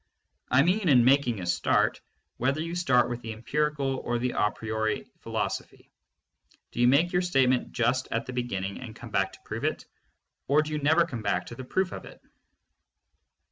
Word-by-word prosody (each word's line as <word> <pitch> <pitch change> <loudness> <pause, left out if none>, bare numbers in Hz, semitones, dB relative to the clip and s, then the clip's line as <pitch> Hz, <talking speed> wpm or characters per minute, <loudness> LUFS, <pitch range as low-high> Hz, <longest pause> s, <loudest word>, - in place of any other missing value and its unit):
I 130 +2 +5
mean 185 +2 +2
in 125 -4 +6
making 130 -4 +3
a - - -4
start, 85 -2 +1 0.4
whether 135 +4 0
you 165 +2 -3
start 135 -9 +3
with 120 0 -4
the 115 -1 -5
em 110 +2 -13
pirical 145 -2 0
or 120 - -1
the 125 +1 -1
a 105 - +2
priori 110 0 -2
philosophy, - - -4 0.8
do - - -7
you 120 - +5
make 150 +7 +4
your 180 - +3
state 135 -8 +3
ment 125 -1 0
just 125 +2 0
at 115 - -2
the 130 - -6
beginning 100 -6 -3
and 115 -4 -9
come 120 0 -10
back 95 -1 +1
to - - -14
prove - - -5
it, - - -1 0.6
or 150 +3 +4
do 155 - -7
you 150 - -1
never 160 +4 +4
come 125 -9 -6
back 90 -4 0
to 120 - -9
the 130 - -7
proof 185 +7 0
of - - -7
it? - - -13
125 Hz, 200 wpm, -27 LUFS, 115-150 Hz, 0.8 s, in